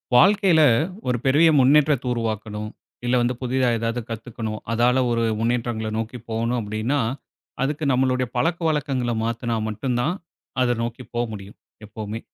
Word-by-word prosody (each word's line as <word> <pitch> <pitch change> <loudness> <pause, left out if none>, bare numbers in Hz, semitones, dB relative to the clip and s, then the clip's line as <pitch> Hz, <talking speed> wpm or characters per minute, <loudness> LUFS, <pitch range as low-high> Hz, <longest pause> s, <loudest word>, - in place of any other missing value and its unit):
வாழ்க்கையில 190 +2 +5 0.5
ஒரு 125 -1 +1
பெரிய 150 +5 +5
முன்னேற்றத்தை 140 0 +4
உருவாக்கணும். 110 -2 -3 0.4
இல்லை 125 +1 +2
வந்து 120 +1 0
புதிதா 130 0 +1
ஏதாவது 115 +2 -2
கத்துக்கணும். 110 -1 -5
அதால 120 +2 +3
ஒரு 115 0 +1 0.2
முன்னேற்றங்களை 115 -1 -1
நோக்கி 115 +2 -4
போகணும் 115 +2 0
அப்படின்னா, 110 +7 -1 0.6
அதுக்கு 145 +3 -1
நம்மளுடைய 130 0 +1
பழக்கவழக்கங்களை 145 -4 0
மாத்தினா 115 +1 -2
மட்டும் 120 +4 -2
தான் 155 +9 0 0.5
அதை 120 -1 +3
நோக்கி 120 +2 -5
போமுடியும் 110 -4 -4 0.3
எப்போவுமே. 110 +1 -6
120 Hz, 125 wpm, -23 LUFS, 115-130 Hz, 0.6 s, வாழ்க்கையில